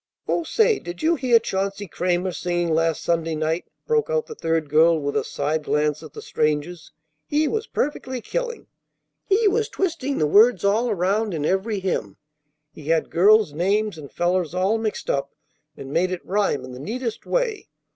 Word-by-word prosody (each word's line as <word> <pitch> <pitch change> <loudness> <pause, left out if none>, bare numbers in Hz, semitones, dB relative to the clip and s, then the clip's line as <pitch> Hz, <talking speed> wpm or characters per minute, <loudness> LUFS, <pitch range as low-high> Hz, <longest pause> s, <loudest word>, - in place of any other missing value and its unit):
"Oh, 340 - 0
say! 445 +5 +2
Did 175 0 -8
you 325 +2 +4
hear 255 -6 +4
Chauncey 195 -2 -2
Cramer 180 +2 -1
singing 175 -1 -1
last 165 0 +1
Sunday 165 -1 0
night?" 160 +2 -1 0.2
broke 460 0 +1
out 485 -1 0
the 455 - -8
third 165 - -1
girl 160 +3 +4
with 145 -1 -3
a - - +1
side 150 +2 -2
glance 150 0 0
at 155 - -11
the - - -9
strangers. 155 +3 -2 0.4
"He 300 +1 +1
was 440 +4 -2
perfectly 260 -3 -2
killing. 480 - -4 0.6
He 415 +2 +3
was 440 +3 +1
twisting 330 - -2
the 155 - +2
words 205 +4 +5
all 220 +5 +2
around 200 +1 0
in 150 -2 -2
every 195 +4 0
hymn. 110 - -2 0.6
He 150 - -12
had 160 +1 +1
girls' 205 -1 +5
names 200 +5 0
and 150 -3 -10
fellers' 175 -1 0
all 195 +5 +1
mixed 220 -1 -3
up, 140 0 -2 0.4
and 135 +1 -8
made 180 +2 +2
it 185 - -5
rhyme 195 -9 0
in 130 - -10
the 125 - -9
neatest 230 - -4
way. - - -1
185 Hz, 180 wpm, -23 LUFS, 160-245 Hz, 0.6 s, words